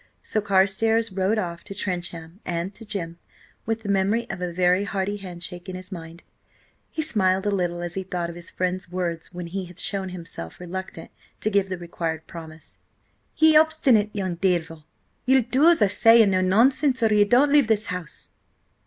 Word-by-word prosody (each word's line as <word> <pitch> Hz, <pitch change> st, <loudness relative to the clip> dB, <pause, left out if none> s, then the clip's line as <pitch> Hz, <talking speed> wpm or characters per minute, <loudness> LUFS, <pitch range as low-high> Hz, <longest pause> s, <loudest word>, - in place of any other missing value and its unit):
So 215 Hz, -, -1 dB
Carstares 205 Hz, +3 st, +2 dB
rode 190 Hz, +3 st, 0 dB
off 170 Hz, -4 st, -3 dB
to 195 Hz, -, -9 dB
Trencham 175 Hz, -2 st, -4 dB
and 175 Hz, +2 st, -3 dB
to 225 Hz, -, -10 dB
Jim, 170 Hz, -5 st, -5 dB, 0.5 s
with 225 Hz, 0 st, -2 dB
the 205 Hz, -, -5 dB
memory 200 Hz, +4 st, +1 dB
of 190 Hz, -2 st, -7 dB
a 180 Hz, -1 st, -2 dB
very 180 Hz, +2 st, +2 dB
hearty 200 Hz, +1 st, -2 dB
handshake 180 Hz, -1 st, -7 dB
in 185 Hz, -, -5 dB
his 185 Hz, +2 st, -8 dB
mind. 165 Hz, -1 st, -9 dB, 0.7 s
He 315 Hz, -, -1 dB
smiled 190 Hz, -9 st, +1 dB
a 205 Hz, -, +1 dB
little 175 Hz, -3 st, -1 dB
as 175 Hz, -1 st, -4 dB
he 190 Hz, -, -2 dB
thought 180 Hz, -2 st, -3 dB
of 170 Hz, -, -8 dB
his 175 Hz, -1 st, -8 dB
friend's 185 Hz, -1 st, -3 dB
words 175 Hz, -2 st, -3 dB
when 175 Hz, -1 st, -6 dB
he 185 Hz, +2 st, -4 dB
had 175 Hz, 0 st, -14 dB
shown 195 Hz, 0 st, -3 dB
himself 165 Hz, -, -8 dB
reluctant 180 Hz, -1 st, -7 dB, 0.3 s
to 215 Hz, -, 0 dB
give 200 Hz, -1 st, +2 dB
the 185 Hz, -, -3 dB
required 165 Hz, -2 st, -4 dB
promise: 160 Hz, -1 st, -11 dB, 0.6 s
"Ye 315 Hz, 0 st, +6 dB
obstinate 305 Hz, -9 st, +4 dB
young 190 Hz, -4 st, -2 dB
devil, 170 Hz, -4 st, -1 dB, 0.4 s
ye'll 265 Hz, -1 st, +5 dB
do 265 Hz, +8 st, +4 dB
as 335 Hz, -10 st, +4 dB
I -, -, +5 dB
say, 225 Hz, +3 st, +6 dB
and 200 Hz, -, +2 dB
no 185 Hz, 0 st, +2 dB
nonsense, 255 Hz, +7 st, +3 dB
or 220 Hz, -1 st, +4 dB
ye 210 Hz, 0 st, +6 dB
don't 250 Hz, +7 st, +4 dB
leave 290 Hz, -5 st, +5 dB
this 220 Hz, -1 st, +1 dB
house!" 180 Hz, -5 st, -6 dB
190 Hz, 190 wpm, -24 LUFS, 175-215 Hz, 0.7 s, Ye